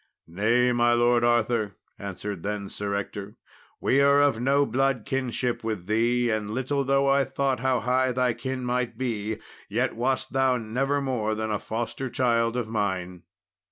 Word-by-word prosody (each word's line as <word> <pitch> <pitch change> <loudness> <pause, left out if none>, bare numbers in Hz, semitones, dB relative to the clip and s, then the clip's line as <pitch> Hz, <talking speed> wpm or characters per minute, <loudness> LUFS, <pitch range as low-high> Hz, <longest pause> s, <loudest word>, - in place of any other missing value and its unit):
"Nay, 115 +8 +2
my 120 0 +3
Lord 120 0 +3
Arthur," 120 -3 +1 0.2
answered 100 -1 -5
then 100 0 -3
Sir 100 0 -3
Ector, 100 +1 -5 0.4
"we 140 - +3
are 140 0 +5
of 145 -5 +3
no 140 +3 +3
blood 135 0 0
kinship 125 -2 -2
with 110 -5 -3
thee, 120 +4 +2
and 105 -1 -2
little 130 +5 -1
though 135 +1 +2
I 135 0 +4
thought 135 -2 -1
how 130 0 +1
high 130 +1 +2
thy 125 -1 +1
kin 130 +2 -4
might 120 -2 -1
be, 110 -4 -2 0.3
yet - - 0
wast 130 +3 -1
thou 130 -1 +3
never 135 +5 -1
more 115 -5 -1
than 110 0 -2
foster 120 +4 -4
child 115 -1 +1
of 120 -3 -2
mine." 95 -5 -2
120 Hz, 160 wpm, -26 LUFS, 110-130 Hz, 0.4 s, are